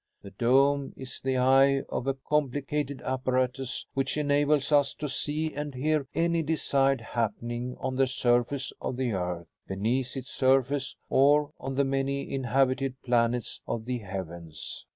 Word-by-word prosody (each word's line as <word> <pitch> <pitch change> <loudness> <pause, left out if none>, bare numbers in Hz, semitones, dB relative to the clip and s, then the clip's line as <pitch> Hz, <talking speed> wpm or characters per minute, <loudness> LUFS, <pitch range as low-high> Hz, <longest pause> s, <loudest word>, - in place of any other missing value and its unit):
The 100 - -10
dome 135 +6 +3
is 130 -1 -7
the 130 -1 0
'eye' 135 +2 +5
of 130 - -3
a 135 - +1
complicated 145 0 -1
apparatus 130 0 -1
which 135 +2 -1
enables 145 0 +2
us 145 -2 +4
to 150 - -4
see 150 +3 -1
and 145 -2 -5
hear 150 +1 0
any 170 0 +2
desired 135 -4 +1
happening 120 +2 -3
on 130 0 -2
the 135 0 +4
surface 125 +1 +1
of 125 - -3
the 130 -2 0
earth, 90 -3 -2 0.2
beneath 120 +7 -1
its 130 -1 -7
surface, 135 +1 +2
or 145 +2 +4
on 135 0 -4
the 140 +1 +3
many 135 +1 -1
inhabited 135 0 +1
planets 120 -1 +1
of 110 -1 -3
the 125 0 -2
heavens. 85 - -7
135 Hz, 150 wpm, -28 LUFS, 125-140 Hz, 0.2 s, eye